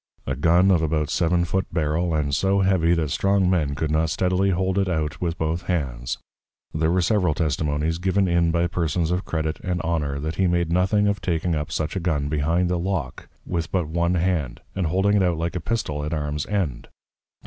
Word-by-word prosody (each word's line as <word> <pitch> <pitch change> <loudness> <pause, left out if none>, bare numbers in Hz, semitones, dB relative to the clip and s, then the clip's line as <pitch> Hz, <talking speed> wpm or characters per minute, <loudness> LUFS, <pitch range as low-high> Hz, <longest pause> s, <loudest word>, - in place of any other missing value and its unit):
A 65 - -2
Gun 85 +7 +4
of 85 -4 +3
about 75 -1 0
seven 85 0 +2
foot 95 +2 -1
Barrel, 80 +1 0
and 70 -2 -1
so 95 +5 +2
heavy 90 -3 +3
that 80 -4 -1
strong 100 +2 +2
Men 80 -6 +1
could 75 +1 -2
not 80 +1 +1
steadily 95 +3 +1
hold 95 +1 +1
it 95 -1 +1
out 75 -3 -2
with 85 -1 -1
both 80 +2 -2
hands; 65 -9 -2 0.6
there 80 0 +1
were 90 +1 +2
several 90 -6 +2
Testimonies, 75 +1 -1
given 95 +1 +1
in 85 -1 +2
by 85 +1 +1
Persons 85 -1 -1
of 90 +2 -1
Credit 80 -1 -2
and 90 -2 -2
Honor, 75 -4 -1
that 80 +3 -4
he 95 - +3
made 85 -1 +1
nothing 95 +4 +2
of 100 0 0
taking 85 -1 -1
up 75 -2 -3
such 75 +3 -2
a - - 0
Gun 75 -5 -1
behind 80 +4 +1
the 90 0 0
Lock, 85 -8 -3 0.2
with 85 -1 -3
but 90 -5 0
one 85 +2 0
hand, 85 -7 -1
and 95 -3 -1
holding 95 +5 +2
it - - +3
out 90 -3 +1
like 85 +2 -2
a 90 - -2
Pistol, 80 -8 -2
at 75 +2 -2
Arms 75 0 -3
end. 85 -13 -2
85 Hz, 210 wpm, -23 LUFS, 75-90 Hz, 0.6 s, Gun